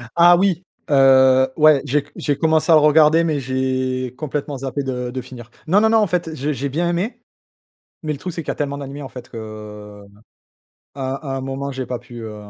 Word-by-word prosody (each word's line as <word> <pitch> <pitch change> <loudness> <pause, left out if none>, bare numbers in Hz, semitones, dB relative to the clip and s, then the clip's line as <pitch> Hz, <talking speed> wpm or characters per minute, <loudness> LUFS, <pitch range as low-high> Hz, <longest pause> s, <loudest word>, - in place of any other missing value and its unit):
Ah 175 +1 +7
oui. 185 -2 +1 0.3
Heu, 130 -1 +5
ouais. 155 -2 +5
J'ai 145 +3 +1
c - - -20
j'ai 145 -1 -1
commencé 160 +1 +2
à - - +8
le 155 - +6
regarder 155 +2 +5
mais 155 -3 0
j'ai 130 -1 -2
complètement 145 -1 -4
zappé 135 +1 -3
de 125 -2 -3
de 130 +1 -4
finir. 120 -1 -12 0.2
Non, 200 +5 +4
non, 220 - +4
non, 225 - +4
en 210 - +2
fait, 175 -1 -1
j'ai 150 +1 -2
j'ai 140 +1 -3
bien 170 +5 -1
aimé. 180 +8 -3 0.8
Mais 155 - -2
le 140 - -8
truc, 180 +3 -5
c'est 165 -1 -5
qu'il - - -3
y - - -15
tellement 140 -1 -3
d'animés 140 0 -7
qu'en 135 -2 -7
fait, 125 -1 -11
que, 115 - -9
heu, 105 -1 -10 0.9
à 135 +1 -4
à - - -2
un - - -5
moment 135 +1 -4
j'ai 130 -1 -5
pas 125 0 -4
pu, 120 0 -12
heu. 110 -1 -7
140 Hz, 225 wpm, -20 LUFS, 130-155 Hz, 0.9 s, à